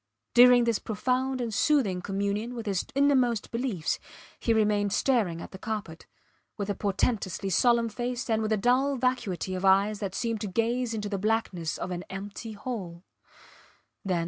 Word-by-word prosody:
During 245 0 +8
this 230 -3 +1
profound 255 +4 -1
and 230 -2 -3
soothing 205 -8 +2
communion 200 +5 -2
with 230 -1 -5
his 195 -3 -1
innermost 260 -6 +2
beliefs 230 -9 -1 0.4
he 230 - 0
remained 210 -2 +2
staring 205 -11 +1
at - - -10
the 190 - -10
carpet, 210 -7 -5 0.5
with 205 -1 -2
a - - 0
portentously 195 -2 -1
solemn 235 +4 +3
face 240 +2 -3
and 220 -2 +1
with 215 0 -1
a 215 - +3
dull 255 +6 +2
vacuity 245 -8 -1
of 185 0 -4
eyes 200 +2 +4
that 195 -3 -4
seemed 230 -3 -2
to 210 - -2
gaze 230 +4 0
into 210 -1 -3
the 200 -1 -3
blankness 195 -6 -1
of 185 - -4
an 180 0 -4
empty 205 +3 -7
hole. 195 -6 -6
215 Hz, 165 wpm, -28 LUFS, 195-245 Hz, 0.5 s, During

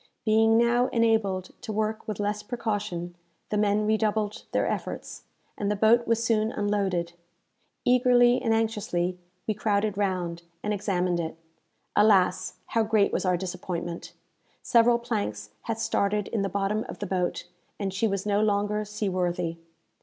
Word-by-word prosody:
Being 225 +1 +4
now 240 +1 +3
enabled 220 -5 +1
to 230 - -5
work 215 +1 -2
with 215 -2 -4
less 205 0 -1
precaution, 210 -6 -3 0.4
the - - -1
men 210 0 +2
redoubled 215 -1 0
their - - +1
efforts, - - -4 0.3
and 205 - -2
the 210 - +1
boat 225 +3 +4
was 230 0 +2
soon 220 -1 +2
unloaded. 195 -5 -1 0.7
Eagerly 245 -1 +5
and 230 -3 0
anxiously 205 -5 0 0.3
we 215 - 0
crowded 205 -1 0
round, 180 -4 -1 0.2
and 210 - 0
examined 180 -3 0
it. 165 -1 -4 0.6
Alas, 190 -3 +3
how 230 - +2
great 215 -2 +2
was - - 0
our 180 -1 +2
disappointment! 175 -2 -5 0.5
Several 235 0 +5
planks 155 - -3 0.2
had 225 - 0
started 210 -2 0
in 220 - -1
the 195 - -1
bottom 200 +2 0
of - - -6
the 205 - -4
boat, 180 -2 -2 0.3
and 195 -2 -2
she 200 +4 +1
was 195 -1 -2
no 205 0 +2
longer 210 0 +1
sea 210 0 -3
worthy. 175 -2 -1
210 Hz, 155 wpm, -27 LUFS, 185-220 Hz, 0.7 s, Eagerly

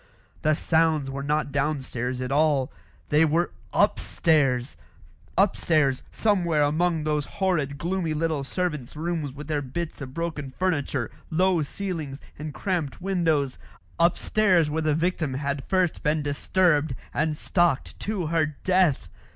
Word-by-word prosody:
The 155 0 +3
sounds 160 -4 +2
were 140 +1 -4
not 150 +1 0
downstairs 130 -4 -2
at 130 +1 -3
all; 145 -3 +2 0.4
they 150 +2 +5
were 165 +3 +2 0.2
upstairs 135 -7 +2 0.6
upstairs, 155 -9 +2
somewhere 175 -8 +2
among 160 +2 +1
those 150 -1 0
horrid 155 -8 0
gloomy 170 -1 -1
little 155 -2 0
servants' 150 -4 -3
rooms 160 -2 -2
with 145 +2 -9
their 150 -2 0
bits 155 +4 -5
of 130 -1 -7
broken 160 -5 -3
furniture, 145 -9 0 0.2
low 180 +1 +2
ceilings, 155 -4 -4 0.2
and 155 0 -5
cramped 165 -4 -2
windows 165 -8 0 0.4
upstairs 175 -1 +3
where 160 +1 0
the 155 -1 +2
victim 160 -4 0
had 140 0 -3
first 185 -3 +1
been 150 0 +1
disturbed 150 0 +2 0.2
and 155 -1 0
stalked 175 -6 +1
to 205 -5 -2
her 155 -2 0
death. 180 - +3
155 Hz, 135 wpm, -26 LUFS, 140-170 Hz, 0.6 s, they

